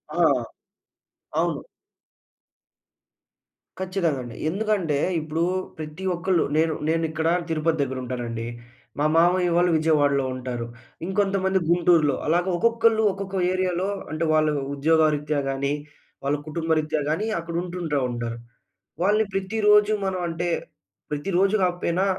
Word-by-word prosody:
ఆ! - - +1 1.2
అవును. - - 0 2.2
ఖచ్చితంగా 180 -7 -1
అండి. 120 -2 -9
ఎందుకంటే 195 -6 0 0.2
ఇప్పుడు 160 +2 -2 0.3
ప్రతి 155 +4 -7
ఒక్కళ్ళు 180 0 +1
నేను 160 0 +3 0.2
నేనిక్కడ 160 0 0 0.2
తిరుపతి 160 0 0
దగ్గర 130 -1 -2
ఉంటానండి. 120 -2 -4 0.5
మా 150 - +2
మామయ్య 175 +1 +4
వాళ్ళు 175 0 +3
విజయవాడలో 145 -4 +2
ఉంటారు. 125 -2 -4 0.4
ఇంకొంతమంది 190 -1 +1
గుంటూరులో. 170 -5 +4
అలాగా 175 +3 +2
ఒక్కొక్కళ్ళు 230 +1 +3
ఒక్కొక్క 195 -1 -3
ఏరియా‌లో 185 0 0 0.2
అంటే 155 +2 -1
వాళ్ళ 155 0 +3 0.3
ఉద్యోగరీత్యా 150 0 +2
గాని, 140 +1 -1 0.5
వాళ్ళ 145 +1 +2
కుటుంబరీత్యా 155 -1 0
గాని 195 +8 0
అక్కడ 170 0 -6
ఉంటుంటా 170 -5 -2
ఉంటారు. 120 -1 -4 0.7
వాళ్ళని 210 +2 +3
ప్రతిరోజు 210 +2 +3
మనం 185 -1 -1
అంటే 170 +1 -2 0.6
ప్రతిరోజు 190 +7 +1
కాకపోయినా 180 +1 +1
165 Hz, 110 wpm, -24 LUFS, 150-190 Hz, 2.2 s, మామయ్య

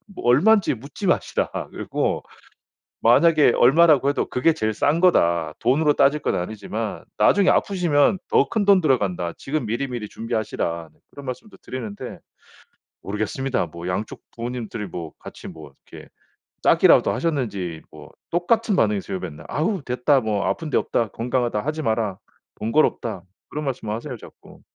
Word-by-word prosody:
"뭐 - - -8
얼만지 185 - +4
묻지 140 - -6
마시라, - - 0 0.2
그리고 - - -2 0.8
만약에 150 +4 +5
얼마라고 140 +1 +5
해도 145 - -1
그게 130 +6 +3
제일 110 -8 -1
싼 145 +10 +1
거다. 85 - +3
돈으로 145 +5 +3
따질 145 +2 +3
건 - - 0
아니지만 110 +3 -4
나중에 190 - +4
아프시면 175 -3 +2
더 140 - +3
큰 210 +5 0
돈 200 -2 +6
들어간다. 100 - 0
지금 150 0 -3
미리미리 120 -1 -3
준비하시라." 85 -7 -3 0.2
그런 140 - -11
말씀도 160 - -7
드리는데. 115 -6 -7 0.9
모르겠습니다. 110 +2 -2
뭐 85 +2 -8
양쪽 95 +4 -4
부모님들이 115 -3 -5
뭐 85 -2 -7
같이 - - -10
뭐 75 -3 -11 0.2
이렇게 - - -12 0.5
짜기라도 - - +5
하셨는지 100 - -2
뭐 - - -13 0.2
똑같은 205 +5 +1
반응이세요. 100 -3 0
맨날 75 -4 -8
"아우 170 - -1
됐다, 130 +2 +2
뭐 105 -3 -1
아픈 160 -2 -2
데 - - +1
없다, 115 - 0
건강하다 120 -1 -1
하지 155 +2 -2
마라, 110 -5 -1 0.4
번거롭다." 115 - 0 0.3
그런 150 +1 -4
말씀을 120 -5 -3
하세요 125 +3 -6
자꾸. - - -16
125 Hz, 350 characters per minute, -23 LUFS, 105-150 Hz, 0.9 s, 돈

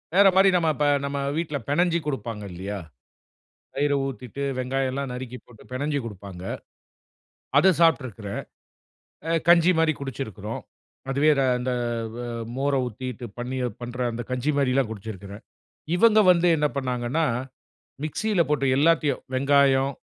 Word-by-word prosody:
வேற 200 +1 +7
மாரி 195 +1 +6
நம்ம 165 -3 +3
இப்ப 150 - +1 0.2
நம்ம 140 0 -3 0.2
வீட்ல 155 -3 -2
பெனஞ்சி 170 +3 +2
கொடுப்பாங்க 115 -6 -4
இல்லையா, 95 +3 -5 1.0
தயிர 145 +1 +1
ஊத்திட்டு, 135 0 -5 0.2
வெங்காயம் 130 +1 -1
எல்லாம் 135 0 -3
நறுக்கி 125 0 -6
போட்டு 115 -3 -17
பெனஞ்சி 145 +3 -1
குடுப்பாங்க. 100 -4 -8 1.1
அதை 185 +6 +6
சாப்ட்ருக்குறேன். 120 -11 +1 0.9
அ - - +1 0.2
கஞ்சி 175 +1 +7
மாரி 160 -1 +3
குடிச்சிருக்கிறோம். 110 -6 -5 0.5
அதுவே 140 +3 +3
ர - - +3 0.2
இந்த 125 +1 -2 0.4
வ - - -7 0.4
மோரை 140 0 +1
ஊத்திட்டு, 125 +1 -6
பண்ணி 125 +2 -4 0.2
பண்ற 120 +1 -6
அந்த 120 +1 -4
கஞ்சி 130 +4 0
மாரிலாம் 135 -3 +2
குடிச்சிருக்கிறேன். 100 -1 -8 0.5
இவங்க 215 +3 +5
வந்து 175 0 +3
என்ன 150 0 +2
பண்ணாங்கன்னா 130 +4 0 0.8
மிக்ஸில 190 +5 0
போட்டு, 140 -2 +1
எல்லாத்தையும், 155 -1 +3
வெங்காயம், 140 0 +3
135 Hz, 130 wpm, -25 LUFS, 120-150 Hz, 1.1 s, வேற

